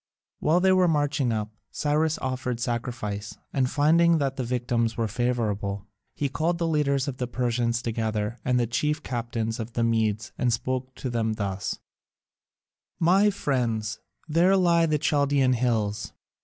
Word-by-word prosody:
While 160 +4 +3
they 190 0 +4
were 185 -1 +4
marching 145 -5 +1
up, 110 -1 -2 0.2
Cyrus 155 +1 0
offered 130 -2 -2
sacrifice, 115 -4 -3 0.2
and 130 -2 +1
finding 165 +4 +4
that 135 -3 -1
the 130 - -2
victims 120 -1 -1
were 115 -1 0
favourable, 105 -4 -1 0.3
he 145 - 0
called 165 +5 0
the 170 - -1
leaders 140 -4 +1
of 130 -3 -4
the 125 - -2
Persians 120 -1 0
together 110 -1 -2
and 125 -1 +2
the 120 - +2
chief 150 +7 -1
captains 115 -2 -3
of 115 +1 -5
the 115 - 0
Medes 110 -2 0
and 125 -2 +2
spoke 130 +2 -2
to 130 - -4
them 115 -2 0
thus: 100 -3 -3 1.2
"My 190 +5 +5
friends, 115 - -1 0.3
there 175 +5 +4
lie 170 -2 +4
the 155 -1 +2
Chaldaean 140 -3 +2
hills. 110 -4 -1
125 Hz, 155 wpm, -26 LUFS, 115-150 Hz, 1.2 s, My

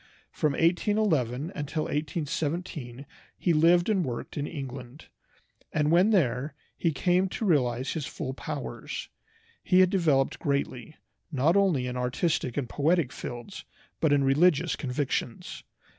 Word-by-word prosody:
From 150 -2 0
1811 165 - +1
until 150 -2 -3
1817 150 -3 -3 0.3
he 175 - +1
lived 170 +3 +4
and 200 -5 +2
worked 120 -5 -5
in 145 0 -2
England, 135 -1 -8 0.6
and 150 0 +1
when 180 +5 +5
there 140 - +1 0.2
he 165 - 0
came 180 +5 +2
to 220 - -3
realize 130 - +1
his 155 -4 -3
full 130 - -5
powers. - - -6 0.5
He 185 -1 +4
had 185 -1 +4
developed 155 -9 +2
greatly, 140 0 -2 0.4
not 150 +5 +2
only 185 -10 +3
in 125 0 -4
artistic 125 +1 -1
and 135 -4 -1
poetic 150 +1 +1
fields, 120 +11 -7 0.4
but 160 - +2
in 145 -1 +4
religious 145 +4 +3
convictions. 130 -3 -3
150 Hz, 130 wpm, -28 LUFS, 130-175 Hz, 0.6 s, when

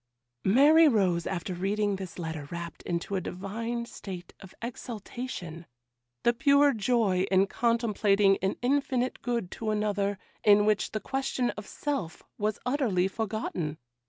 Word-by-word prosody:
Mary 295 +10 +7
rose 185 - +2
after 185 0 -3
reading 200 +3 0
this 190 -3 -7
letter 160 -4 -5
wrapped 170 0 -6
into 175 +3 -3
a 190 - 0
divine 225 +7 -4
state 185 -6 -8
of 190 - -12
exaltation,—the 170 - -5
pure 280 +2 +4
joy 205 -4 +1
in 190 0 +4
contemplating 210 -3 +2
an 195 +1 0
infinite 260 -1 0
good 235 -7 -2
to 220 - -4
another, 205 -2 0 0.3
in 205 0 +6
which 215 -1 +2
the 215 - -1
question 265 +1 -1
of 210 0 -9
self 275 - -4 0.2
was 210 0 0
utterly 245 -9 +1
forgotten. 195 -7 -3
205 Hz, 130 wpm, -28 LUFS, 185-235 Hz, 0.3 s, Mary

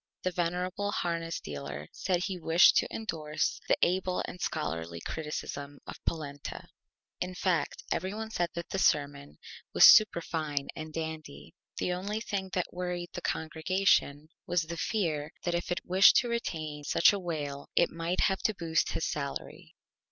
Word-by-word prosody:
The 185 - 0
venerable 180 +4 -1
Harness 165 -2 -2
Dealer 70 0 -6
said 180 -2 -1
he 190 -2 -3
wished 165 +1 +6
to - - +3
indorse 155 -8 -2
the - - +3
Able 185 +1 +1
and 180 - -8
Scholarly 80 +2 -3
Criticism 145 - -5
of - - -10
Polenta. 145 -3 -4 0.5
In 180 0 -3
fact, 180 -2 0
every 185 - -1
one 220 +1 -5
said 175 -5 0
the 170 +3 -3
Sermon 140 - +1 0.4
was - - +9
Superfine 160 -8 +5
and 155 0 -6
Dandy. 155 - -6 0.2
The 180 - 0
only 200 +4 -3
thing 195 -4 -3
that 180 -1 -1
worried 180 -1 -3
the 180 - -5
Congregation 160 -2 +1 0.2
was 175 -2 +2
the 165 +2 -6
Fear 160 -8 -1
that 175 - 0
if 175 +1 -2
it 175 - -2
wished 190 +2 +7
to 245 - +3
retain 155 -10 -3
such 165 - +5
a 200 - -1
Whale 145 -6 -4
it 170 - +4
might 165 +2 -1
have 190 -1 +2
to 215 - +2
boost 165 -3 0
his - - -1
Salary. 140 -2 -5
170 Hz, 160 wpm, -30 LUFS, 150-185 Hz, 0.5 s, was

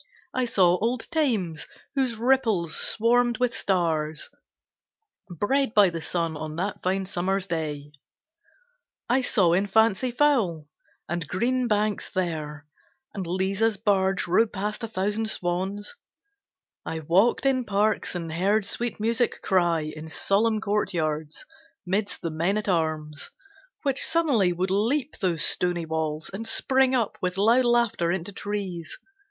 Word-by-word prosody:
I 255 -1 0
saw 180 -6 +3
old 235 +2 0
Thames, 220 - 0 0.3
whose 260 -4 0
ripples 225 -8 +1
swarmed 240 +1 +3
with 250 0 0
stars 160 -5 -1 1.0
Bred 225 - 0
by 200 -4 +6
the 165 -1 -5
sun 165 0 -1
on 155 0 -6
that 190 +4 -3
fine 190 +1 0
summer's 190 +1 -1
day; 150 -5 -4 1.2
I 255 +3 +2
saw 190 -8 +3
in 195 +3 +2
fancy 220 +3 +3
fowl 235 - +1 0.4
and 170 -2 -3
green 245 - 0
banks 210 -2 0
there, 155 -5 -3 0.5
And 190 -4 -5
Liza's 195 +4 0
barge 195 -2 +1
rowed 205 +6 +2
past 210 +3 -4
a - - -2
thousand 215 +1 -1
swans. 190 +3 -1 0.9
I 160 0 -4
walked 185 - +2
in 260 -2 +2
parks 210 -2 0
and 165 -2 -4
heard 200 +5 +2
sweet 235 +1 -2
music 230 +2 0
cry 175 -3 +2
In 155 +1 -7
solemn 215 +6 +1
courtyards, 160 -8 -2 0.4
midst 200 +3 -2
the 165 - -2
men 170 +6 0
at 215 - -3
arms; 155 -4 -1 0.5
Which 275 -3 +1
suddenly 290 - +2
would 185 +2 -2
leap 250 +9 0
those 170 -5 0
stony 175 -2 +1
walls 160 -1 -3
And 225 +4 -3
spring 265 +2 +3
up 235 -4 -1
with 180 0 -2
loud 230 +5 +4
laughter 235 -8 +2
into 190 +2 -3
trees. 190 -5 -5
195 Hz, 135 wpm, -25 LUFS, 170-225 Hz, 1.2 s, by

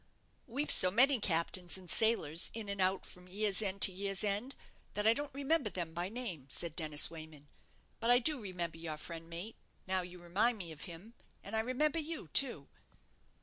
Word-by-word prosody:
"We've 275 +5 -1
so 185 - +7
many 255 +6 +5
captains 175 0 0
and 185 -1 -13
sailors 175 -6 +1
in 220 -3 -5
and 200 -1 -2
out 185 +1 +1
from 180 0 -13
year's 200 +1 +1
end 200 -1 -1
to 195 - +6
year's 195 +1 -1
end, 210 +6 -1 0.4
that 210 - -1
I 220 - +6
don't 290 +4 -4
remember 280 -2 0
them 170 -4 -4
by 175 +2 -2
name," 200 - -5
said 165 +4 0
Dennis 155 -3 +3
Wayman; 155 -3 -10 0.5
"but 230 - -1
I 245 - +7
do 275 +3 +3
remember 175 -5 -4
your 160 -2 -5
friend, 165 +1 -8
mate, 175 +7 -7 0.3
now 190 0 0
you 180 0 -9
remind 195 +7 +1
me 175 -5 -6
of 155 - -9
him; 185 +5 -10 0.3
and 200 - -6
I - - +3
remember 265 +7 +1
you, 310 - -5
too." 200 - +4
195 Hz, 190 wpm, -34 LUFS, 170-230 Hz, 0.5 s, so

